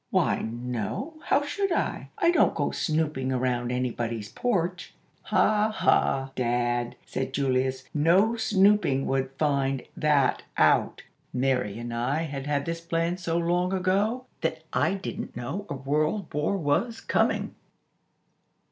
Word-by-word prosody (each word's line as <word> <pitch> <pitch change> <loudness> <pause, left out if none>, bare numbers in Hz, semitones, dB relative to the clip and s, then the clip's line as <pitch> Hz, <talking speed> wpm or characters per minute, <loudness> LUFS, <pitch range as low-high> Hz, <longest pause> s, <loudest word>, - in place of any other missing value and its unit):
"Why, - - +2
no; 120 - -4
how 285 - +2
should 390 +6 -1
I? - - -1
I 340 - +4
don't 350 - +3
go - - 0
snooping 155 -5 -1
around 125 -1 0
anybody's 120 -4 -2
porch." 180 -7 -2 0.3
"Ha, 215 0 +3
ha, 135 -10 +2
Dad," 120 0 0
said 130 0 -4
Julius; 130 -1 0
"no 180 +9 +4
snooping 200 -10 +3
would 135 0 0
find 135 -3 +1
that 145 -3 +2 0.2
out. - - +3 0.3
Mary 125 -5 0
and 120 0 -5
I 130 +7 0
had 140 -3 -5
had 145 -1 0
this 165 0 -3
plan 170 +1 -1
so 170 -2 -1
long 175 +2 +1
ago 200 +7 +1 0.2
that - - -2
I 195 - +2
didn't 195 - -6
know 180 +12 -4
a 145 - -3
World 150 +8 -1
War 150 +7 0
was 195 +9 0
coming!" - - 0
145 Hz, 135 wpm, -27 LUFS, 130-185 Hz, 0.3 s, I